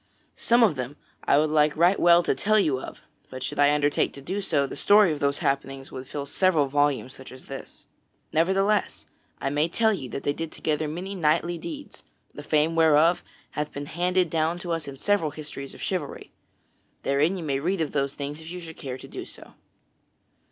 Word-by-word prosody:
Some 235 +1 +3
of 185 -11 +3
them 125 +3 -4 0.3
I 140 - +4
would 155 +1 +2
like 150 -1 +3
right 175 +4 +4
well 175 0 +6
to - - +1
tell 215 +1 +2
you 145 -10 +2
of, - - -9 0.3
but 130 0 -7
should - - -4
I 145 0 +6
undertake 145 0 +1
to - - -10
do 190 +7 -3
so, 150 -7 +1
the - - -7
story 205 -3 +5
of 150 - -3
those 140 0 +1
happenings 135 0 -2
would 130 0 -7
fill 140 0 -5
several 160 +1 +2
volumes 140 -2 0
such 130 - -12
as 130 0 -12
this. 135 -1 -10 0.5
Nevertheless, 190 - +1 0.3
I 135 - -2
may 150 +3 +1
tell 220 +4 +2
you 135 -10 -5
that 130 - -5
they 145 - +1
did 165 +1 -5
together 155 0 -1
many 180 +6 -5
knightly 170 0 +1
deeds, 295 - -8 0.3
the - - -8
fame 155 +1 +1
whereof 160 +1 +4 0.3
hath 150 0 -3
been 145 +1 -6
handed 180 +2 0
down 160 +1 +1
to 175 - -3
us 165 -3 -2
in 135 -1 -7
several 200 0 +1
histories 145 -2 -8
of - - -9
chivalry. 180 -7 -4 0.7
Therein 150 +7 +2
you 175 - -5
may 140 -3 -1
read 180 +6 -1
of 160 -3 -1
those 140 -1 -1
things 145 +2 -5
if 160 - -10
you 180 +1 -6
should 165 -2 -10
care 130 -2 -6
to - - -12
do - - -7
so. - - -11
155 Hz, 210 wpm, -26 LUFS, 140-175 Hz, 0.7 s, well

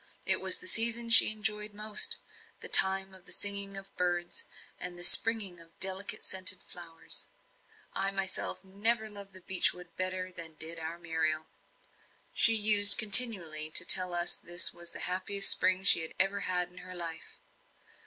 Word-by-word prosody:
It - - +1
was - - 0
the 365 - -14
season 230 -4 +2
she 230 - +7
enjoyed 210 -1 -6
most 215 - -1 0.4
the - - -5
time 190 0 +2
of 190 -1 -20
the - - -8
singing 200 -1 -2
of 195 0 -12
birds, 175 -1 -6 0.3
and 180 -1 -7
the 175 - -10
springing 205 -4 +3
of 165 0 -21
delicate 195 +2 -2
scented 185 0 +1
flowers. 165 -2 -5 0.7
I 195 0 -5
myself 195 0 -4
never 215 +3 -3
loved 200 -1 -14
the 185 - -12
beech 185 0 +2
wood 180 -1 -19
better 185 0 -5
than 165 -3 -9
did 165 +1 -4
our 160 +1 -10
Muriel. 160 -2 -4 0.9
She 225 - +3
used 205 -1 +6
continually 195 -9 +7
to - - +2
tell 180 -1 +2
us 175 0 -3
this 175 +1 -2
was 170 0 -13
the - - -9
happiest 190 +2 -1
spring 185 +1 -2
she 195 - +2
had 160 - -9
ever 195 +1 -1
had 180 -2 -5
in 180 - -17
her 185 0 -13
life. 165 -2 -10
190 Hz, 170 wpm, -26 LUFS, 175-205 Hz, 0.9 s, she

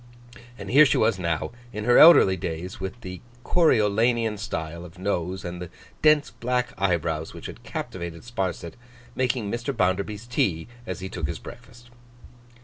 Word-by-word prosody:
And - - -7
here 145 +4 +8
she - - +2
was 110 -3 +2
now, 85 -3 -2 0.2
in 105 -1 -5
her 120 +2 +5
elderly 155 - +8
days, 85 +1 -5
with 95 +5 -6
the 90 -3 -8 0.2
Coriolanian 115 - +2
style 85 -5 -5
of 90 +1 -12
nose 95 -1 -2
and 90 0 -6
the 90 - -6 0.3
dense 150 -1 +4
black 125 +1 -1
eyebrows 85 -4 -1
which - - -10
had - - -8
captivated 85 -2 -6
Sparsit, 95 -7 -4 0.4
making 125 -5 -1
Mr. 120 +2 -3
Bounderby's 100 +3 0
tea 95 -9 -1 0.2
as 95 0 -5
he 95 - -4
took 85 -5 -4
his - - -4
breakfast. 120 0 -13
100 Hz, 155 wpm, -25 LUFS, 90-120 Hz, 0.4 s, here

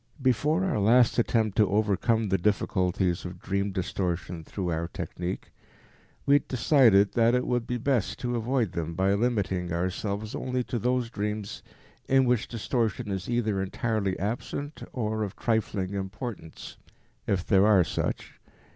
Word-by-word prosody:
Before 145 - +2
our 180 - 0
last 115 +4 +4
attempt 110 -3 +1
to 105 -3 +4
overcome 105 +2 +1
the 95 0 +2
difficulties 90 -2 0
of 90 0 -7
dream 100 +2 -1
distortion 90 -2 -3
through 90 +2 -4
our 85 +1 -1
technique, 90 +2 -5 0.7
we 140 - +4
had 145 - +3
decided 115 -6 +4
that 115 +1 +4
it 125 - +1
would 120 -2 -1
be 125 - -1
best 120 -3 0
to 120 -1 -1
avoid 120 -3 0
them 85 0 -4
by 95 +2 +2
limiting 100 -6 0
ourselves 100 +5 -2
only 125 -1 -2
to 120 - -3
those 125 0 0
dreams 105 -1 -4 0.5
in 135 0 +5
which 125 -3 +1
distortion 115 -1 -2
is 95 +1 -4
either 110 -5 0
entirely 100 -1 -1
absent 125 +8 -4
or 110 -3 -2
of 105 -1 -3
trifling 105 -4 -1
importance, 100 - -6 0.5
if 90 -3 0
there 100 0 +4
are 100 -4 +6
such. - - -4
105 Hz, 150 wpm, -27 LUFS, 95-120 Hz, 0.7 s, are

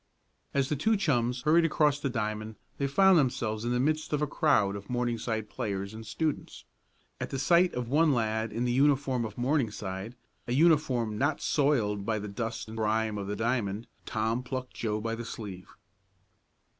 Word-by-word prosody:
As 140 -1 +1
the 150 - +1
two 220 +10 +2
chums 125 -8 0
hurried 160 +3 +5
across 150 -3 +2
the 140 - -1
diamond 110 -2 -3 0.2
they 140 - +1
found 190 +5 +5
themselves 115 -5 -1
in 120 - 0
the 125 - +1
midst 155 +3 0
of 150 - +2
a 150 - +1
crowd 120 - +2
of 100 0 -9
Morningside 120 -3 -1
players 100 -1 -4
and 110 +1 -8
students. 160 -2 -3 0.5
At - - -4
the 135 - -3
sight 170 +7 +3
of 125 -1 -2
one 150 +5 +4
lad 110 -3 0
in 115 +3 -1
the 120 - +1
uniform 135 -2 +2
of 105 -2 -8
Morningside, 115 -6 -2 0.3
a 120 - -1
uniform 130 -8 +3
not 145 +3 +1
soiled 115 -9 +1
by 110 +1 0
the 105 0 -5
dust 110 +3 -4
and 110 +1 -8
grime 110 -1 0
of 100 - -5
the 105 - -2
diamond, 115 -2 -1 0.2
Tom 110 +2 0
plucked 130 0 -5
Joe 110 -2 -2
by 115 +1 -2
the 115 +1 -4
sleeve. 100 -5 -8
120 Hz, 180 wpm, -29 LUFS, 110-140 Hz, 0.5 s, hurried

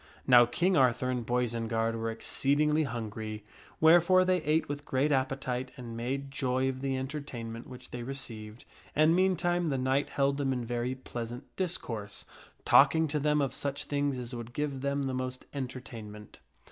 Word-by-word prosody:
I.NOW 120 -2 +8
King 175 +10 +1
Arthur 130 -2 +3
and 125 -2 -2
Boisenard 115 -1 0
were 115 0 -2
exceedingly 150 +6 +1
hungry, 110 -3 -5 0.3
wherefore 175 +3 +6
they 185 -1 +2
ate 155 +1 +1
with 145 0 -5
great 140 +2 +1
appetite 130 -1 -1
and 120 -2 -7
made 135 +4 -3
joy 130 -1 0
of 130 0 -3
the 135 -1 -1
entertainment 130 -4 -5
which 125 0 -11
they 120 - -5
received, 115 -4 -7 0.3
and 155 +2 +5
meantime 175 -2 +2
the 140 -3 0
knight 130 +2 +1
held 140 0 +1
them 135 -2 0
in 125 -2 -3
very 120 +2 -2
pleasant 120 0 -6
dis 180 -2 0
course, 105 -4 -7 0.4
talking 160 +4 +6
to 150 +1 0
them 150 +1 +2
of 135 -2 -1
such 140 +1 -2
things 145 -2 -1
as 125 0 -6
would 120 0 -7
give 145 -2 -2
them 140 0 0
the 135 -1 -2
most 130 0 -4
enter 130 -2 -4
tainment. 105 -4 -10
130 Hz, 170 wpm, -30 LUFS, 120-145 Hz, 0.4 s, I.NOW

